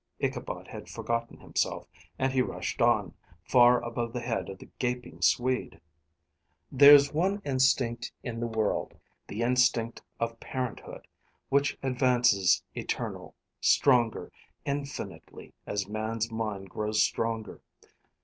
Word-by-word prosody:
Ichabod - - -3
had - - -9
forgotten 115 0 -3
himself, - - -2 0.3
and 130 0 0
he 130 - +3
rushed - - -3
on, - - +3 0.3
far 120 +5 +5
above 120 0 -3
the 125 - -2
head 115 -1 -2
of 95 - -7
the - - -13
gaping 125 -9 -3
Swede. 125 +9 +1 0.9
"There's 140 +1 +8
one 190 +6 +1
instinct 130 -3 +1
in 115 -2 -5
the 120 - -1
world, 110 -2 -1 0.3
the 110 +3 -3
instinct 120 -1 +2 0.2
of 115 0 -3
parenthood, 130 -3 -5 0.4
which 140 +1 +2
advances 125 -7 +3
eternal, - - -5 0.2
stronger, 120 -5 +3 0.3
infinitely, 140 0 -6
as 100 -2 -2
man's 110 +2 -3
mind 105 -4 -4
grows 105 0 +1
stronger. 110 0 -2
120 Hz, 120 wpm, -28 LUFS, 110-130 Hz, 0.9 s, There's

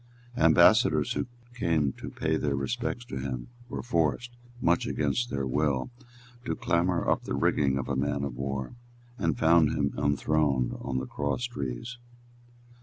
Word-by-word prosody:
Ambassadors 80 0 +5
who - - -2 0.3
came 80 - +1
to - - -8
pay - - -1
their 70 -2 0
respects 120 - -3
to 65 - -6
him 65 - -4 0.2
were - - -4
forced, 115 +2 0 0.3
much 85 -6 +2
against 120 0 0
their 70 -1 -2
will, 70 - 0 0.5
to 125 - -2
clamber 85 +1 +1
up - - +1
the - - -2
rigging 70 -2 +2
of 70 - -3
a 70 - -1
man 70 +1 -1
of 70 -3 -3
war, 65 - -3 0.5
and 80 -2 0
found 80 -2 +5
him 70 -1 0
enthroned 70 -3 +1
on 65 -2 -2
the 65 - -2
cross 70 - -2
trees. 120 - -4
75 Hz, 155 wpm, -28 LUFS, 70-85 Hz, 0.5 s, Ambassadors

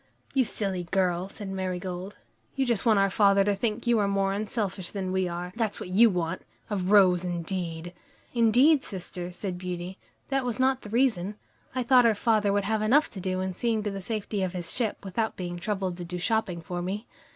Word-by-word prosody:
"You 265 - +4
silly 195 -6 -2
girl," 185 0 0
said 205 -1 -7
Marigold, 185 0 -4 0.4
"you 270 - +1
just 235 -2 +1
want 220 -2 +5
our 195 0 +3
father 200 0 +5
to 205 +1 +2
think 215 +2 -2
you 235 -2 +3
are 205 - +2
more 195 -1 +1
unselfish 200 -3 -2
than 190 -2 -3
we 190 -1 +1
are 175 +1 -5
that's 225 -3 -1
what - - -6
you 220 +5 +6
want! 175 -4 -2 0.3
A - - +1
rose, 185 -2 +5
indeed!" 175 -1 -3 0.4
"Indeed, 250 +6 +5
sister," 180 -1 -5
said 180 0 -5
Beauty, 180 0 -5 0.3
"that 270 -1 +1
was 245 0 -2
not 260 0 +2
the 210 - -9
reason. 215 -5 +1 0.4
I 255 - 0
thought 245 -1 +6
our 225 - +3
father 210 -1 +2
would 200 0 +1
have 215 +2 0
enough 265 +8 +3
to 195 - -7
do 185 0 -2
in 190 0 -2
seeing 225 +2 0
to 205 - -2
the 195 0 -5
safety 210 0 -3
of 185 -1 -1
his 175 -2 -3
ship, 225 -5 -1
without 220 +4 -1
being 175 -1 -4
troubled 190 -2 -2
to 175 - -5
do 180 +1 -5
shopping 185 -2 0
for 175 +1 -4
me." 200 +5 -3
195 Hz, 205 wpm, -27 LUFS, 180-220 Hz, 0.4 s, you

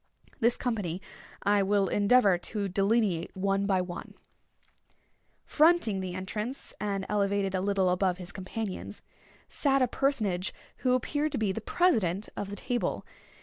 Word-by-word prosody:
This 235 +1 +3
company 205 -8 -2 0.4
I 205 0 +3
will 200 0 +2
endeavor 205 0 +4
to 205 +1 -3
delineate 195 -2 +1
one 195 +1 +1
by 190 -2 +2
one. 180 -1 -7 1.3
Fronting 310 - +3
the 185 -1 -4
entrance, 210 +7 -5
and 200 -2 -2
elevated 200 -1 0
a 185 - 0
little 195 -1 +1
above 180 0 +1
his 180 -1 -6
companions, 195 +1 -6 0.4
sat 275 -2 +2
a - - +3
personage 215 -9 0 0.2
who 250 -1 +1
appeared 290 +4 0
to - - 0
be 215 -3 +1
the 225 - -4
president 210 - +1
of 200 - -4
the 205 - -5
table. 245 +4 -2
200 Hz, 145 wpm, -29 LUFS, 190-230 Hz, 1.3 s, endeavor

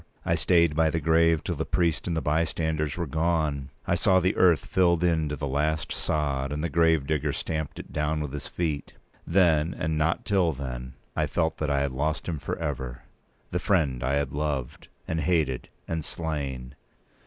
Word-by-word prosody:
I - - +2
stayed 85 -4 +3
by 80 0 +3
the 80 - 0
grave 80 -1 +3
till 90 - -2
the 80 0 -2
priest 85 0 0
and 85 -2 -1
the - - -1
bystanders 80 0 0
were 85 - -1
gone. 80 -3 0 0.2
I - - +1
saw 95 +1 +4
the 90 +2 +1
earth 85 -4 +4
filled 85 -2 +2
in 80 -3 +2
to 75 - -2
the 70 +1 -4
last 75 +2 0
sod, 70 -3 -1
and 75 +1 -3
the 85 - 0
gravedigger 80 -2 +2
stamp 80 -2 -3
it - - -9
down 75 0 0
with 75 -3 -4
his 75 - -4
feet. 80 -4 -3 0.3
Then, 85 -3 +3
and 80 0 -1
not 80 +3 +1
till 95 -5 +2
then, 65 -2 -6 0.2
I - - +1
felt 80 0 0
that 75 - -1
I 70 -1 +2
had 70 -1 0
lost 75 +4 -2
him 80 -4 -2
for - - -3
ever—the 65 +3 -6
friend 80 - +1
I 65 +2 +1
had 70 -2 0
loved, 70 -2 -3 0.2
and 80 0 -1
hated, 80 -8 0 0.2
and 80 -1 -2
slain. 70 -6 -3
80 Hz, 190 wpm, -27 LUFS, 70-85 Hz, 0.3 s, saw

